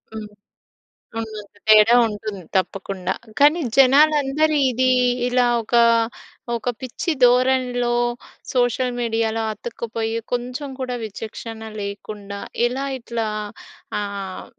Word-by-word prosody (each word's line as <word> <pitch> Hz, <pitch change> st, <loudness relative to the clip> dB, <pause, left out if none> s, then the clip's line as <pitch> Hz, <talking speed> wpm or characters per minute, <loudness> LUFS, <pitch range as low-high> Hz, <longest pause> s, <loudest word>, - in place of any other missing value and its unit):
హ్మ్. 220 Hz, -, -5 dB, 0.9 s
హ్మ్. 225 Hz, -1 st, -4 dB, 0.3 s
తేడా 215 Hz, +2 st, +7 dB
ఉంటుంది 210 Hz, -2 st, -6 dB, 0.2 s
తప్పకుండా. 190 Hz, 0 st, -2 dB, 0.3 s
కానీ, 295 Hz, +4 st, +6 dB, 0.2 s
జనాలందరి 295 Hz, +2 st, +4 dB
ఇది 255 Hz, +2 st, +1 dB, 0.4 s
ఇలా 250 Hz, 0 st, +3 dB, 0.2 s
ఒకా, 235 Hz, +1 st, +3 dB, 0.7 s
ఒక 230 Hz, +2 st, -2 dB
పిచ్చి 260 Hz, +6 st, -3 dB
ధోరణిలో 250 Hz, -1 st, +3 dB, 0.6 s
సోషల్ 245 Hz, 0 st, +1 dB
మీడియాలో 225 Hz, -1 st, 0 dB
అతుక్కుపోయి, 225 Hz, 0 st, -4 dB, 0.2 s
కొంచెం 250 Hz, +4 st, -3 dB
కూడా 250 Hz, -1 st, -3 dB
విచక్షణ 220 Hz, +1 st, -7 dB, 0.2 s
లేకుండా, 200 Hz, 0 st, -6 dB, 0.3 s
ఇలా 265 Hz, +3 st, -3 dB
ఇట్లా 230 Hz, -2 st, -3 dB, 0.7 s
ఆహ్, 200 Hz, -2 st, -5 dB
235 Hz, 95 wpm, -21 LUFS, 215-255 Hz, 0.9 s, తేడా